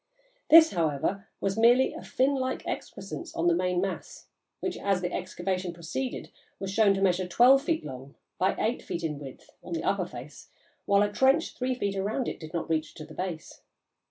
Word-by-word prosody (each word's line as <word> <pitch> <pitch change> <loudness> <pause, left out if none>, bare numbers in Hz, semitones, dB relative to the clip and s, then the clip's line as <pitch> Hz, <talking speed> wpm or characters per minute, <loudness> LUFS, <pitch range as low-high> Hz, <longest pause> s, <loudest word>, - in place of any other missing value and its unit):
This, 320 0 +9
however, 170 +4 -1
was 195 +2 -1
merely 245 +3 +5
a - - -8
fin 265 +2 +1
like 260 -1 -2
excrescence 345 - -6
on 165 - -1
the 175 - +5
main 180 +1 +1
mass, 190 +1 -4 0.3
which, 370 - -3
as 195 -2 0
the 180 -1 -3
excavation 185 -1 -3
proceeded, 175 +10 -5 0.3
was 195 -1 -4
shown 205 -2 +4
to 195 - -1
measure 185 -1 +2
twelve 250 +9 +6
feet 320 +2 -1
long 135 -1 -9 0.2
by 190 +1 +2
eight 235 +3 0
feet 170 - -5
in 150 -3 -2
width, 135 -3 -11
on 175 - -7
the 165 - -2
upper 190 -3 0
face, 130 0 -11 0.4
while 200 0 +5
a 205 - 0
trench 270 +8 +3
three 255 0 -1
feet 200 -5 -2
round 220 +6 -1
it - - -4
did 155 -1 -9
not 170 -1 -3
reach 155 -1 -1
to 155 - -8
the - - -12
base. 180 -4 -6
190 Hz, 195 wpm, -28 LUFS, 170-245 Hz, 0.4 s, This